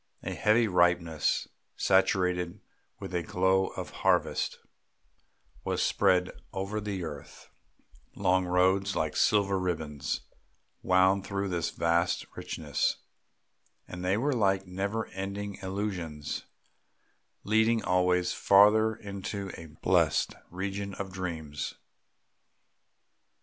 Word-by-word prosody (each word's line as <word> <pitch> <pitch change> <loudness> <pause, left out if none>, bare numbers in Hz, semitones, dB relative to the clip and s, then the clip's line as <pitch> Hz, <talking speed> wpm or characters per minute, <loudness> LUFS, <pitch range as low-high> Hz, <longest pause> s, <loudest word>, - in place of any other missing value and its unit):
A - - -3
heavy 110 +2 +3
ripeness 85 -4 +2 0.3
saturated 90 -2 +2 0.4
with 95 - -7
the 90 -1 0
glow 95 +3 +2
of - - -6
harvest - - +1 1.1
was - - -1
spread 90 -1 +2 0.2
over 100 +2 -3
the 100 -3 -3
earth; 75 -3 -9 0.7
long 95 -1 +2
roads 95 +2 +2
like 80 -1 -1
silver 100 -2 +3
ribbons 80 -5 -2 0.6
wound 95 +1 +3
through 100 0 -2
this 85 -2 -1
vast 85 +1 +1
richness, 75 -3 -1 0.9
and 90 0 -7
they 95 +2 +2
were 140 +5 +1
like 95 -4 +2
never 100 +4 -2
ending 100 +1 -5
illusions, 95 -6 -4 1.0
leading 110 +2 +2
always 90 -1 +2
farther 110 +3 +5
into 100 -1 -5
a 80 - -9
blessed 75 - +1 0.2
region 95 +2 -4
of 100 -1 -5
dreams. 80 -5 -4
95 Hz, 100 wpm, -29 LUFS, 90-100 Hz, 1.1 s, farther